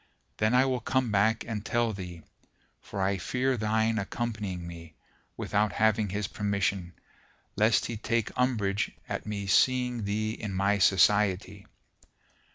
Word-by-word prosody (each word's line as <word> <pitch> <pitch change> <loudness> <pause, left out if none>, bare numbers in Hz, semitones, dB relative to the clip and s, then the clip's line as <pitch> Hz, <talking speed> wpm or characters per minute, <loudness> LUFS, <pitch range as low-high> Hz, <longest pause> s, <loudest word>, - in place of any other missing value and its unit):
Then 110 +3 +2
I 130 +1 +5
will 130 -2 0
come 125 0 0
back 110 +2 +2
and 105 -3 -4
tell 120 -1 0
thee: 90 -4 -8 0.6
for 100 - -4
I 95 0 0
fear 130 +7 0
thine 110 0 +1
accompanying 100 -4 -4
me, 85 -2 -10 0.4
without 105 -1 0
having 110 -1 +2
his 100 +2 -2
permission, 100 -3 -1 0.6
lest 110 +2 +3
he 115 - -4
take 115 0 -1
umbrage 110 -6 +1 0.2
at - - -4
me 100 -1 -3
seeing 125 +2 +2
thee 110 +2 -1
in 105 -3 -5
my 100 +2 +2
society." 100 0 +3
105 Hz, 140 wpm, -28 LUFS, 100-115 Hz, 0.6 s, I